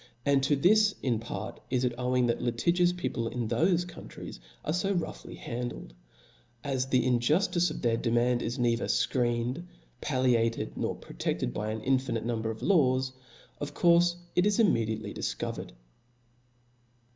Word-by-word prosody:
And 140 Hz, -1 st, +4 dB
to 140 Hz, +2 st, +2 dB
this 210 Hz, +8 st, +4 dB
in 120 Hz, -4 st, +1 dB
part 115 Hz, -, -6 dB
it 125 Hz, -1 st, +1 dB
is 125 Hz, -, +2 dB
owing 125 Hz, 0 st, +1 dB
that 120 Hz, -1 st, 0 dB
litigious 170 Hz, +10 st, +2 dB
people 175 Hz, -10 st, -3 dB
in 120 Hz, 0 st, -3 dB
thofe 175 Hz, -, +2 dB
countries 175 Hz, -, -9 dB, 0.3 s
are 155 Hz, -, 0 dB
fo 195 Hz, +3 st, +1 dB
roughly 175 Hz, -3 st, -4 dB
handled: 120 Hz, -, -5 dB, 0.7 s
as 135 Hz, -2 st, -1 dB
the 130 Hz, -2 st, +2 dB
injuftice 155 Hz, +9 st, +2 dB
of 155 Hz, -, -7 dB
their 115 Hz, -1 st, +2 dB
de 115 Hz, -, -1 dB
mand 120 Hz, +1 st, +2 dB
is 120 Hz, +4 st, -3 dB
neither 120 Hz, -1 st, +1 dB
fcreened, 120 Hz, +4 st, 0 dB, 0.4 s
palliated 120 Hz, -, +1 dB
nor -, -, -2 dB
prote(5led -, -, -3 dB
by 105 Hz, +8 st, -3 dB
an 110 Hz, 0 st, -3 dB
infinite 130 Hz, -3 st, 0 dB
number 115 Hz, -2 st, -1 dB
of 110 Hz, 0 st, -6 dB
laws, 130 Hz, -8 st, +3 dB, 0.5 s
of 145 Hz, 0 st, -5 dB
courfe 175 Hz, 0 st, +4 dB, 0.2 s
it 180 Hz, +3 st, +4 dB
i* 210 Hz, +2 st, +3 dB
immediately 110 Hz, -, 0 dB
difcovered. -, -, -4 dB
125 Hz, 150 wpm, -29 LUFS, 115-170 Hz, 0.7 s, And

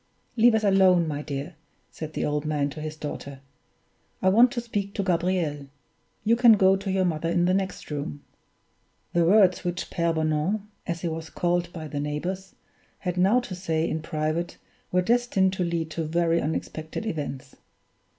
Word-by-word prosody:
"Leave 235 Hz, 0 st, +5 dB
us 220 Hz, -, +1 dB
alone, 190 Hz, -4 st, +4 dB
my 145 Hz, -1 st, -3 dB
dear," 145 Hz, +3 st, -5 dB, 0.4 s
said 155 Hz, -1 st, -7 dB
the -, -, -1 dB
old 150 Hz, 0 st, -1 dB
man 150 Hz, -2 st, -1 dB
to 155 Hz, -, -8 dB
his 155 Hz, 0 st, -5 dB
daughter; 140 Hz, -2 st, -6 dB, 0.8 s
"I 185 Hz, -, +3 dB
want 235 Hz, +6 st, +6 dB
to 245 Hz, -, -1 dB
speak 205 Hz, -4 st, -4 dB
to 200 Hz, -, 0 dB
Gabriel. 170 Hz, -5 st, 0 dB, 0.6 s
You 225 Hz, +2 st, +4 dB
can 235 Hz, -1 st, +7 dB
go 190 Hz, -2 st, +5 dB
to 195 Hz, +1 st, -4 dB
your 190 Hz, -1 st, +2 dB
mother 165 Hz, -1 st, -1 dB
in 175 Hz, +1 st, +2 dB
the 180 Hz, -, +3 dB
next 190 Hz, -4 st, -2 dB
room." 140 Hz, -, -4 dB, 0.9 s
The 170 Hz, -1 st, +3 dB
words 190 Hz, -1 st, +5 dB
which 175 Hz, 0 st, -3 dB
Pere 170 Hz, -1 st, +1 dB
Bonan 160 Hz, +6 st, 0 dB, 0.2 s
as 170 Hz, -1 st, -3 dB
he 175 Hz, -, -1 dB
was 160 Hz, 0 st, -5 dB
called 175 Hz, -1 st, 0 dB
by 160 Hz, -3 st, -7 dB
the 145 Hz, -1 st, -4 dB
neighbors 175 Hz, +7 st, -4 dB, 0.4 s
had 180 Hz, -2 st, -3 dB
now 195 Hz, +7 st, +4 dB
to 240 Hz, -, -7 dB
say 165 Hz, -3 st, -1 dB
in 160 Hz, -, -2 dB
private 155 Hz, +2 st, -2 dB, 0.3 s
were 180 Hz, 0 st, +2 dB
destined 225 Hz, -4 st, +2 dB
to 190 Hz, -, -1 dB
lead 170 Hz, -2 st, -2 dB
to 165 Hz, -, -2 dB
very 170 Hz, +1 st, +1 dB
unexpected 155 Hz, +4 st, -4 dB
events. 145 Hz, -8 st, -5 dB
170 Hz, 180 wpm, -26 LUFS, 155-190 Hz, 0.9 s, can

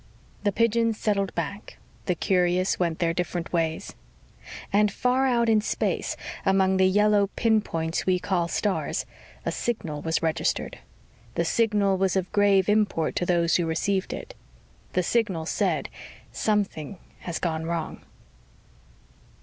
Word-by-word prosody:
The 205 Hz, -, +2 dB
pigeons 230 Hz, +1 st, +2 dB
settled 200 Hz, -3 st, 0 dB
back. 185 Hz, +5 st, -5 dB, 0.3 s
The 180 Hz, -, +2 dB
curious 180 Hz, +1 st, +1 dB
went 170 Hz, -3 st, 0 dB
their 170 Hz, -2 st, +1 dB
different 175 Hz, -1 st, -3 dB
ways. 160 Hz, -2 st, -1 dB, 0.8 s
And 210 Hz, 0 st, +4 dB
far 255 Hz, +2 st, +1 dB
out 235 Hz, -2 st, +2 dB
in 220 Hz, -1 st, +4 dB
space, 215 Hz, -, -1 dB, 0.3 s
among 190 Hz, -1 st, +3 dB
the 190 Hz, 0 st, +5 dB
yellow 205 Hz, +1 st, +3 dB
pinpoints 190 Hz, -9 st, 0 dB
we 185 Hz, -1 st, +4 dB
call 180 Hz, -2 st, 0 dB
stars, 200 Hz, +3 st, -1 dB, 0.4 s
a -, -, 0 dB
signal 165 Hz, -11 st, -3 dB
was 160 Hz, +1 st, -1 dB
registered. 160 Hz, -1 st, -1 dB, 0.6 s
The 170 Hz, -, +1 dB
signal 205 Hz, -2 st, +2 dB
was 190 Hz, -1 st, +1 dB
of 185 Hz, -1 st, -1 dB
grave 200 Hz, -2 st, +4 dB
import 205 Hz, -7 st, +1 dB
to 175 Hz, -, 0 dB
those 170 Hz, -1 st, +3 dB
who 170 Hz, -2 st, 0 dB
received 190 Hz, +4 st, 0 dB
it. -, -, -7 dB, 0.6 s
The 180 Hz, -, +1 dB
signal 190 Hz, -6 st, 0 dB
said, -, -, 0 dB, 0.5 s
_Something 200 Hz, -6 st, -1 dB, 0.2 s
has 175 Hz, -2 st, -4 dB
gone 160 Hz, -2 st, -2 dB
wrong. 165 Hz, -2 st, -3 dB
190 Hz, 135 wpm, -26 LUFS, 170-210 Hz, 0.8 s, the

